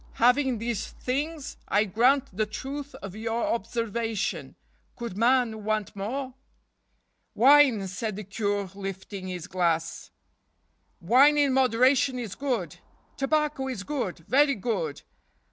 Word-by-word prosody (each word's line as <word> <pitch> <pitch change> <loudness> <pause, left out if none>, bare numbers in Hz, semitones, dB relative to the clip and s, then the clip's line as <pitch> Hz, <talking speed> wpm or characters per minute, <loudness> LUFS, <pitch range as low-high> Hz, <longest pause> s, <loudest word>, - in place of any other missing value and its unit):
Having 250 +1 +3
these 230 -1 -3
things, 290 +3 -4
I 205 +2 +3
grant 240 +3 +2
the 215 +1 0
truth 275 +6 -6
of 195 -1 -7
your 225 +1 -2
observation, 230 -1 -3 0.2
* - - -40
could 235 -6 -5
man 230 -1 +2
want 215 0 -2
more? 255 +7 -4 0.3
' - - -48
" - - -49
" - - -47
Wine," 260 -6 +6
said 210 +2 -4
the 210 - -6
Cure, 200 -1 -2
lifting 195 0 -6
his 180 -3 -5
glass, 170 -2 -1 0.5
" - - -45
wine 260 - +5
in 285 -2 +3
moderation 255 +1 +3
is 230 -6 -5
good. 270 -3 -3 0.4
Tobacco 295 -1 0
is 245 -7 -4
good—very 270 - +1
good. 185 -9 -3
230 Hz, 135 wpm, -27 LUFS, 200-265 Hz, 0.5 s, Wine